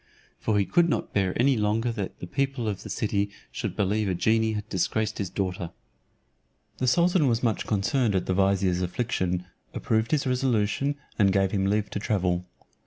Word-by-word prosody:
For 110 Hz, -2 st, +1 dB
he 100 Hz, -, +2 dB
could 170 Hz, -, +3 dB
not -, -, -2 dB
bear 95 Hz, -1 st, 0 dB
any 135 Hz, +2 st, +4 dB
longer 110 Hz, +2 st, +1 dB
that 105 Hz, -4 st, -5 dB
the -, -, -6 dB
people 135 Hz, +3 st, -1 dB
of 100 Hz, -3 st, -2 dB
the -, -, -9 dB
city 100 Hz, -2 st, 0 dB, 0.2 s
should -, -, -4 dB
believe 105 Hz, +1 st, +1 dB
a 90 Hz, -, 0 dB
genie 110 Hz, +5 st, +2 dB
had 105 Hz, 0 st, -4 dB
disgraced 110 Hz, +2 st, -1 dB
his 100 Hz, -3 st, -2 dB
daughter. 90 Hz, -3 st, -3 dB, 1.1 s
The 130 Hz, -, 0 dB
sultan 170 Hz, +3 st, +4 dB
was 120 Hz, -1 st, +1 dB
much 115 Hz, -3 st, 0 dB
concerned 110 Hz, +2 st, +1 dB
at 90 Hz, -, 0 dB
the 95 Hz, -, 0 dB
vizier's 95 Hz, -1 st, +2 dB
affliction, 90 Hz, -2 st, -1 dB, 0.3 s
approved 110 Hz, 0 st, 0 dB
his 150 Hz, -3 st, +1 dB
resolution, 125 Hz, +1 st, +1 dB, 0.2 s
and 100 Hz, -2 st, +5 dB
gave 95 Hz, 0 st, +2 dB
him 95 Hz, -1 st, +1 dB
leave 105 Hz, +1 st, 0 dB
to -, -, -2 dB
travel. 90 Hz, -3 st, 0 dB
105 Hz, 180 wpm, -26 LUFS, 95-120 Hz, 1.1 s, and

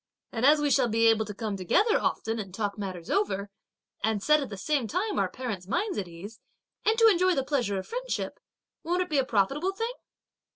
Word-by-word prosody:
And 240 Hz, +3 st, +2 dB
as 300 Hz, +1 st, +6 dB
we 295 Hz, -1 st, +1 dB
shall 260 Hz, -3 st, +4 dB
be 225 Hz, 0 st, +2 dB
able 225 Hz, -1 st, +4 dB
to 210 Hz, -, -6 dB
come 210 Hz, -1 st, -3 dB
together 370 Hz, -, +2 dB
often 225 Hz, +1 st, -1 dB
and 195 Hz, -3 st, -6 dB
talk 205 Hz, +1 st, -2 dB
matters 185 Hz, -5 st, -6 dB
over, 200 Hz, -, 0 dB, 0.5 s
and 215 Hz, -2 st, 0 dB
set 300 Hz, 0 st, +4 dB
at 275 Hz, -, -4 dB
the 200 Hz, -, -7 dB
same 265 Hz, +4 st, 0 dB
time 385 Hz, -, -1 dB
our -, -, +1 dB
parents' 215 Hz, -8 st, -5 dB
minds 385 Hz, -, -1 dB
at 190 Hz, -, -4 dB
ease, 190 Hz, +6 st, -10 dB, 0.4 s
and 440 Hz, +1 st, +2 dB
to 455 Hz, -1 st, +7 dB
enjoy 370 Hz, -3 st, +4 dB
the 270 Hz, -, +1 dB
pleasure 245 Hz, -9 st, 0 dB
of 190 Hz, -, -4 dB
friendship, -, -, -4 dB, 0.4 s
won't 355 Hz, +2 st, +1 dB
it 360 Hz, -, -13 dB
be 290 Hz, -, +3 dB
a -, -, +3 dB
profitable 275 Hz, -, +1 dB
thing!" 455 Hz, +4 st, -3 dB
240 Hz, 215 wpm, -28 LUFS, -, 0.5 s, to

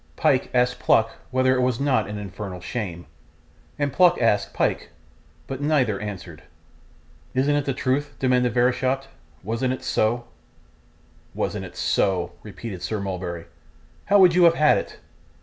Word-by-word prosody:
Pyke -, -, +2 dB
asked 125 Hz, 0 st, +1 dB
Pluck 115 Hz, 0 st, +3 dB, 0.2 s
whether 130 Hz, 0 st, +2 dB
it 130 Hz, -, +1 dB
was 125 Hz, -2 st, 0 dB
not 140 Hz, -2 st, +1 dB
an 105 Hz, -, -5 dB
infernal 100 Hz, -2 st, -7 dB
shame, 90 Hz, -3 st, -5 dB, 0.7 s
and 145 Hz, -2 st, -1 dB
Pluck 180 Hz, +3 st, +5 dB
asked 105 Hz, -4 st, +2 dB
Pyke; -, -, -1 dB, 0.6 s
but 135 Hz, 0 st, -6 dB
neither 135 Hz, -9 st, +1 dB
answered. 95 Hz, -6 st, -7 dB, 0.9 s
'Isn't 140 Hz, +3 st, +2 dB
it 145 Hz, -1 st, 0 dB
the 135 Hz, -, 0 dB
truth?' 140 Hz, +2 st, -1 dB
demanded 125 Hz, -2 st, +1 dB
Verisopht. 130 Hz, +2 st, +1 dB, 0.3 s
'Wasn't 115 Hz, +5 st, -1 dB
it 130 Hz, -, -7 dB
so?' 120 Hz, +2 st, 0 dB, 1.1 s
'Wasn't -, -, -2 dB
it -, -, -12 dB
so!' 90 Hz, -3 st, +1 dB
repeated 100 Hz, -2 st, -8 dB
Sir 110 Hz, -, -3 dB
Mulberry. 90 Hz, -3 st, -4 dB, 0.6 s
'How 205 Hz, -, +4 dB
would 185 Hz, -3 st, +7 dB
you 180 Hz, 0 st, +5 dB
have 165 Hz, 0 st, +5 dB
had 150 Hz, -1 st, +4 dB
it? -, -, -8 dB
125 Hz, 150 wpm, -24 LUFS, 100-135 Hz, 1.1 s, would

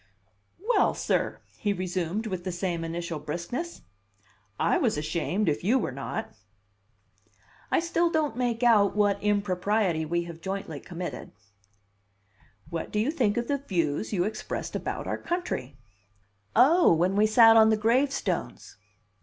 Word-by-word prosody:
"Well, -, -, +3 dB
sir," -, -, -1 dB, 0.2 s
he 205 Hz, -1 st, 0 dB
resumed 185 Hz, +2 st, -2 dB
with 185 Hz, -4 st, -4 dB
the 185 Hz, -, -3 dB
same 175 Hz, -1 st, -2 dB
initial 170 Hz, -1 st, -4 dB
briskness, 175 Hz, -, -5 dB, 0.8 s
"I -, -, +2 dB
was -, -, +1 dB
ashamed 165 Hz, +7 st, -1 dB
if 150 Hz, 0 st, 0 dB
you 230 Hz, +8 st, +3 dB
were 245 Hz, -, -2 dB
not." 135 Hz, +1 st, -5 dB, 1.4 s
"I -, -, +3 dB
still 340 Hz, 0 st, +1 dB
don't 310 Hz, -6 st, 0 dB
make 245 Hz, -1 st, -1 dB
out 210 Hz, -5 st, +4 dB
what 205 Hz, -1 st, +2 dB
impropriety 200 Hz, -3 st, +1 dB
we 170 Hz, +2 st, 0 dB
have 170 Hz, -1 st, -10 dB
jointly 190 Hz, -6 st, -4 dB
committed." 175 Hz, +2 st, -7 dB, 1.4 s
"What 165 Hz, -1 st, -4 dB
do -, -, -2 dB
you 225 Hz, +7 st, +1 dB
think 240 Hz, -9 st, 0 dB
of 235 Hz, 0 st, -1 dB
the 280 Hz, -1 st, 0 dB
views 170 Hz, -, -1 dB
you 185 Hz, -4 st, +1 dB
expressed 215 Hz, +3 st, -4 dB
about -, -, -3 dB
our -, -, -3 dB
country?" 245 Hz, -, -4 dB, 0.8 s
"Oh! 330 Hz, +7 st, +6 dB
When 175 Hz, +4 st, +2 dB
we 210 Hz, +1 st, +4 dB
sat 225 Hz, +1 st, +7 dB
on 220 Hz, -1 st, +7 dB
the 220 Hz, -, +3 dB
gravestones." 255 Hz, +6 st, -1 dB
200 Hz, 145 wpm, -27 LUFS, 170-235 Hz, 1.4 s, sat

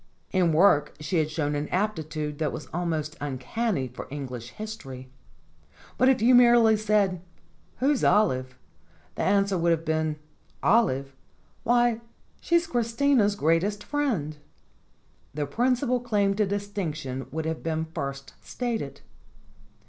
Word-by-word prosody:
In 180 Hz, -3 st, +3 dB
work 155 Hz, -3 st, +4 dB
she 155 Hz, +4 st, -2 dB
had 155 Hz, -1 st, 0 dB
shown 155 Hz, -2 st, -1 dB
an 145 Hz, +1 st, -2 dB
aptitude 155 Hz, -7 st, -2 dB
that 155 Hz, -3 st, 0 dB
was -, -, -6 dB
almost 160 Hz, -3 st, -2 dB
uncanny 145 Hz, -, -2 dB
for 125 Hz, -, -9 dB
Eng 145 Hz, -1 st, -4 dB
lish 120 Hz, -1 st, -7 dB
history. 135 Hz, -, -8 dB, 0.8 s
But 255 Hz, -, +4 dB
if 250 Hz, -5 st, +2 dB
you 235 Hz, -, +5 dB
had 250 Hz, -, +8 dB
merely 235 Hz, -2 st, +6 dB
said: 205 Hz, -4 st, +1 dB, 0.6 s
"Who's 275 Hz, +1 st, +1 dB
Olive?" 130 Hz, -11 st, +2 dB, 0.6 s
the -, -, -4 dB
answer 200 Hz, -1 st, +2 dB
would 170 Hz, +1 st, +2 dB
have 165 Hz, -1 st, +1 dB
been 155 Hz, -1 st, 0 dB, 0.5 s
"Olive? 135 Hz, -, +2 dB, 0.5 s
Why, 240 Hz, -1 st, +2 dB, 0.4 s
she's 340 Hz, 0 st, +2 dB
Christina's 235 Hz, -4 st, +2 dB
greatest 185 Hz, +5 st, +1 dB
friend." 225 Hz, -, -1 dB, 1.0 s
The 150 Hz, -1 st, -1 dB
principal 250 Hz, -, +1 dB
claim 205 Hz, -5 st, +1 dB
to 210 Hz, 0 st, +1 dB
distinction 170 Hz, -10 st, -4 dB
would 160 Hz, +1 st, -4 dB
have 160 Hz, 0 st, -3 dB
been 160 Hz, -1 st, -2 dB
first 140 Hz, -4 st, -6 dB
stated. 230 Hz, -, -4 dB
175 Hz, 135 wpm, -26 LUFS, 150-225 Hz, 1.0 s, had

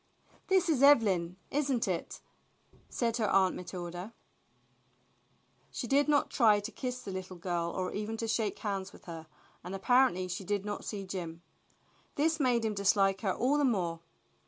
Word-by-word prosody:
"This 380 Hz, -1 st, +3 dB
is 300 Hz, -6 st, +2 dB
Evelyn, 195 Hz, -11 st, +4 dB
isn't 270 Hz, -4 st, 0 dB
it?" -, -, -3 dB, 0.7 s
said 235 Hz, -1 st, -1 dB
her 215 Hz, -4 st, +1 dB
Aunt 190 Hz, -1 st, +3 dB
Matilda. 180 Hz, +3 st, -7 dB, 1.5 s
She -, -, -5 dB
did 280 Hz, +5 st, +3 dB
not 290 Hz, -1 st, +2 dB
try 215 Hz, -5 st, +5 dB
to 205 Hz, +3 st, -6 dB
kiss 250 Hz, -1 st, -5 dB
the 195 Hz, -, -6 dB
little 185 Hz, -1 st, -6 dB
girl 175 Hz, -1 st, -2 dB
or 185 Hz, +1 st, -3 dB
even 215 Hz, +2 st, -3 dB
to 225 Hz, -, -3 dB
shake 220 Hz, -2 st, 0 dB
hands 195 Hz, -2 st, -3 dB
with -, -, -16 dB
her, 165 Hz, -3 st, -8 dB, 0.4 s
and 180 Hz, +3 st, -5 dB
apparently 195 Hz, -3 st, +3 dB
she 180 Hz, +2 st, -4 dB
did 205 Hz, +1 st, -2 dB
not 205 Hz, 0 st, -4 dB
see 200 Hz, -2 st, -4 dB
Jim. 175 Hz, -3 st, -6 dB, 0.7 s
This 315 Hz, +2 st, +1 dB
made 245 Hz, -4 st, +2 dB
him 215 Hz, -, 0 dB
dislike 195 Hz, -1 st, +2 dB
her 195 Hz, -, +1 dB
all 270 Hz, +9 st, +1 dB
the -, -, +2 dB
more. 180 Hz, -10 st, 0 dB
205 Hz, 165 wpm, -31 LUFS, 185-245 Hz, 1.5 s, try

